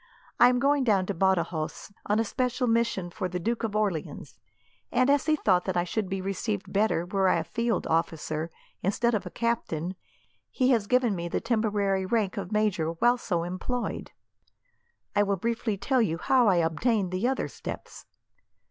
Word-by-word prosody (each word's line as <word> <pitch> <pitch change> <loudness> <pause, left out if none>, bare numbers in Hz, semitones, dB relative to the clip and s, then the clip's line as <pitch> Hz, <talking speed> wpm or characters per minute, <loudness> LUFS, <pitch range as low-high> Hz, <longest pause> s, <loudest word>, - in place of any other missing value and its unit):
I 245 - +8
am 250 - +2
going 280 +2 +2
down 200 -6 +2
to 200 - -2
Badajos, 175 -3 -1 0.2
on 210 - +2
a - - +3
special 250 +2 -1
mission 225 -6 0
for 185 0 -3
the 180 0 -3
Duke 230 +6 -2
of 215 -2 -2
Orleans, 200 -7 -2 0.5
and 255 +2 +3
as 285 +1 +2
he 310 - +4
thought 185 -10 +2
that 190 -2 -1
I 175 - +2
should 190 +2 -2
be 190 0 -2
received 195 +1 -3
better 200 -4 +2
were 190 +1 +1
I - - +3
a 165 - -1
field 235 +6 -1
officer, 160 -1 -1 0.3
instead 235 +5 +1
of 215 - -2
captain, 185 -7 -1 0.6
he 255 0 +2
has 225 -5 +2
given 250 -4 +2
me 170 -1 -3
the - - -1
temporary 205 -4 0
rank 210 -3 0
of 195 -1 -5
major 205 -7 +1
while 240 +8 +3
so 170 -7 -1
employed. 185 +8 -3 1.1
"I 205 - +4
will 200 -1 +1
briefly 225 +1 -1
tell 260 +5 +1
you 165 -7 0
how 250 +6 +3
I 195 - +5
obtained 180 +4 +1
the 185 +6 0
other 265 0 -1
steps. - - -8
205 Hz, 180 wpm, -27 LUFS, 180-235 Hz, 1.1 s, I